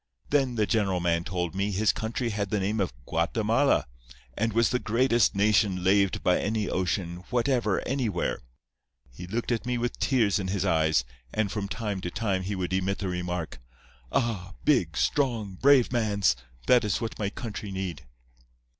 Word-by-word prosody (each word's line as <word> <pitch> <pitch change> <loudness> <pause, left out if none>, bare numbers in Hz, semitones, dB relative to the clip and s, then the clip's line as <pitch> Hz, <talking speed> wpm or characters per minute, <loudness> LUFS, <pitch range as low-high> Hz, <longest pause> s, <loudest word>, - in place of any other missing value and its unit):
Then 135 -4 +2
the 110 -2 +2
general 100 -5 +1
man 85 -1 +1
told 90 -1 -3
me 100 +2 -1
his 105 +2 +2
country 115 +2 -2
had 100 -1 -2
the 105 - 0
name 105 +3 -1
of 95 - 0
Guatemala, 110 - +1 0.5
and 115 +1 0
was 115 +1 +2
the 125 - +1
greatest 120 -1 +2
nation 100 -2 +2
laved 100 +1 +2
by 90 - +3
any 105 -1 -1
ocean 90 -1 -1
whatever 120 -4 +1
anywhere. 120 -9 -1 0.7
He 90 +9 -9
looked 115 +6 -2
at 115 - 0
me 125 0 0
with 120 0 -3
tears 110 -7 +2
in 95 - -3
his 95 0 -1
eyes, 80 -6 +2 0.3
and 110 -3 -1
from 105 -2 -3
time 100 0 -3
to 90 - -3
time 95 0 -1
he 100 +2 -3
would 90 -1 -3
emit 95 +1 0
the 95 - -3
remark, 90 -4 -4 0.5
'Ah! 110 - -1
big, 80 -4 +2
strong, 115 - 0
brave 130 +5 +4
mans! 100 - +2 0.3
That 125 -1 +5
is 105 -3 0
what 115 0 -5
my 100 -2 0
country 105 -1 -6
need. 95 -8 -5
100 Hz, 170 wpm, -27 LUFS, 90-115 Hz, 0.7 s, That